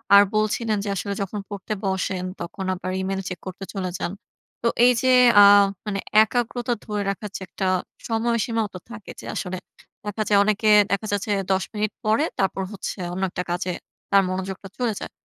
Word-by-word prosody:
আর 200 Hz, -, +10 dB
বলছিলেন 215 Hz, +1 st, +1 dB
যে 205 Hz, -, -3 dB
আসলে 200 Hz, +2 st, -3 dB
যখন 200 Hz, +2 st, -3 dB
পড়তে 205 Hz, +1 st, -4 dB
বসেন 190 Hz, -1 st, -1 dB, 0.2 s
তখন 190 Hz, +2 st, -5 dB
আবার 185 Hz, 0 st, -4 dB
ইমেইল 195 Hz, 0 st, -2 dB
চেক 180 Hz, -, -6 dB
করতে 185 Hz, +1 st, -6 dB
চলে 190 Hz, -3 st, -2 dB
যান। 175 Hz, -, -3 dB, 0.5 s
তো 235 Hz, -, +1 dB, 0.2 s
এই 250 Hz, -, +7 dB
যে 260 Hz, -, +2 dB, 0.3 s
আ -, -, +10 dB, 0.4 s
মানে 200 Hz, -2 st, -2 dB, 0.2 s
একাগ্রতা 240 Hz, +1 st, -1 dB
ধরে 210 Hz, -1 st, -2 dB
রাখার 205 Hz, +2 st, -4 dB
যে -, -, -14 dB
একটা 190 Hz, +2 st, -4 dB, 0.4 s
সময়সীমাও 230 Hz, -1 st, 0 dB
তো 185 Hz, -, -7 dB
থাকে, 230 Hz, -4 st, -9 dB
যে -, -, -11 dB
আসলে 185 Hz, -1 st, -3 dB, 0.5 s
দেখা 210 Hz, +1 st, -2 dB
যায় 205 Hz, -1 st, +5 dB
অনেকে 215 Hz, +1 st, +2 dB, 0.2 s
দেখা 200 Hz, +2 st, 0 dB
যাচ্ছে 205 Hz, +1 st, -1 dB, 0.2 s
১০ 190 Hz, -1 st, +2 dB
মিনিট 215 Hz, 0 st, -1 dB
পরে 220 Hz, +7 st, +3 dB, 0.2 s
তারপর 195 Hz, 0 st, 0 dB
হচ্ছে 200 Hz, -, -5 dB, 0.2 s
অন্য 190 Hz, +2 st, -3 dB
একটা 180 Hz, 0 st, -3 dB
কাজে 180 Hz, +1 st, -1 dB, 0.4 s
তার 200 Hz, -1 st, +6 dB
মনোযোগটা 190 Hz, +1 st, -4 dB
চলে 245 Hz, -3 st, 0 dB
যায়। -, -, -7 dB
200 Hz, 180 wpm, -23 LUFS, 190-220 Hz, 0.5 s, আর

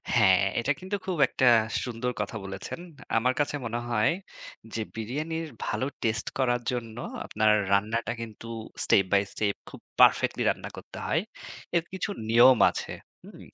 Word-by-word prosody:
হ্যাঁ, 95 Hz, -4 st, +5 dB, 0.2 s
এটা 125 Hz, +5 st, 0 dB
কিন্তু 190 Hz, +3 st, -3 dB
খুব 185 Hz, -2 st, -2 dB
একটা 130 Hz, -, 0 dB, 0.4 s
সুন্দর 125 Hz, 0 st, -2 dB
কথা 105 Hz, -, -4 dB
বলেছেন। 95 Hz, +11 st, -6 dB, 0.4 s
আমার 125 Hz, +3 st, +2 dB
কাছে 145 Hz, 0 st, 0 dB
মনে 115 Hz, +1 st, -2 dB
হয় 110 Hz, -2 st, +3 dB, 0.6 s
যে 115 Hz, -, -2 dB
বিরিয়ানির 155 Hz, +9 st, -3 dB, 0.2 s
ভালো 130 Hz, -, -1 dB, 0.2 s
টেস্ট 110 Hz, -1 st, 0 dB
করার 120 Hz, -2 st, +1 dB
জন্য 115 Hz, -2 st, -5 dB, 0.3 s
আপনার 110 Hz, 0 st, +2 dB, 0.2 s
রান্নাটা 110 Hz, +4 st, +1 dB
কিন্তু 115 Hz, 0 st, -8 dB, 0.4 s
স্টেপ 95 Hz, -, +5 dB
বাই 100 Hz, -, +6 dB
স্টেপ 100 Hz, -2 st, 0 dB
খুব -, -, -12 dB, 0.2 s
পারফেক্টলি -, -, +5 dB
রান্না -, -, -3 dB
করতে -, -, -10 dB
হয়। -, -, +2 dB, 0.6 s
এর 170 Hz, -, +1 dB
কিছু 190 Hz, +3 st, -3 dB, 0.2 s
নিয়ম 120 Hz, +2 st, +7 dB
আছে। -, -, -5 dB, 0.3 s
হুম? -, -, -13 dB
115 Hz, 150 wpm, -27 LUFS, 110-130 Hz, 0.6 s, নিয়ম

